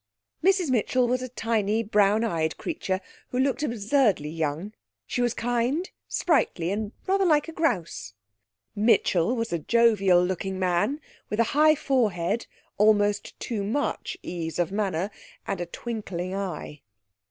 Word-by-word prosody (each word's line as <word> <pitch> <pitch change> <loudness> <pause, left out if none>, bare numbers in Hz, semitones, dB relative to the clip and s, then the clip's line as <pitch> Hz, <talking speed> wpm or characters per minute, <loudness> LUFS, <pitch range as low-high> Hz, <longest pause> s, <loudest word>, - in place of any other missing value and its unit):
Mrs 375 -5 +3
Mitchell 250 +1 +2
was 250 +1 0
a 255 - -5
tiny 225 -2 0
brown 210 0 +3
eyed 160 -8 -1
creature, 195 - -3 0.3
who 250 - -3
looked 265 +2 +1
absurdly 230 - +1
young; 160 +5 -3 0.3
she 245 - -2
was 240 -1 +1
kind, 245 +9 -1 0.2
sprightly, 225 - +1
and 210 +1 -2
rather 390 +1 +2
like 305 -4 +3
a - - -5
grouse. 185 - -2 0.6
Mitchell 210 -1 +3
was 230 -3 -2
a 170 - 0
jovial 195 -3 +4
looking 190 +1 -3
man, 185 - +1 0.3
with 210 - -2
a - - +6
high 310 +2 +6
forehead, 225 - 0 0.3
almost 205 -1 +2
too 220 -4 -3
much 235 +9 -2
ease 165 -2 -4
of 175 +1 0
manner, 195 -2 -1 0.3
and 195 -3 -3
a 175 - -3
twinkling 190 -4 -5
eye. 180 -6 -5
215 Hz, 140 wpm, -26 LUFS, 185-250 Hz, 0.6 s, a